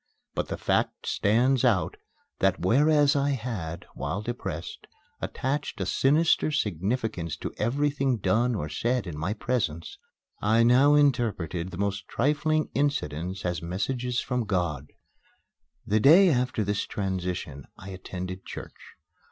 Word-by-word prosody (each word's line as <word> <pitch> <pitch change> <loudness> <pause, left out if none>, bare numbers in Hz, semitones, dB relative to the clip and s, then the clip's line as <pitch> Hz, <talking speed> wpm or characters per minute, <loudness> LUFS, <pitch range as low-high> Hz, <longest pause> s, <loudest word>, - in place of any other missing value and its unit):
But - - -2
the - - -4
fact - - 0
stands 125 +5 +2
out, 115 -8 +2 0.4
that, 95 -1 +2
whereas 145 - +4
I 140 0 +2
had, 110 -10 -5
while 70 +10 -3
depressed, 95 -8 -5 0.3
attached 140 -1 -3
a 95 - -1
sinister 150 - +3
significance 105 - -2
to - - -5
everything 135 +2 +1
done 115 +5 +1
or 75 - -3
said 120 +11 -1
in 85 -4 -6
my 80 +7 -2
presence, 105 -9 -2 0.4
I 110 +3 +4
now 130 +5 +5
interpreted 110 - +1
the 90 - -8
most 100 +1 -2
trifling 150 +4 0
incidents 95 - -1
as 90 -1 -1
messages 120 +9 -2
from 125 -2 -2
God. 85 -8 -1 1.0
The 110 +2 +2
day 170 - +7
after 125 -4 0
this 100 0 -1
transition 90 -7 -4
I 95 - -10
attended 95 0 -6
church. - - -9
110 Hz, 130 wpm, -27 LUFS, 90-130 Hz, 1.0 s, day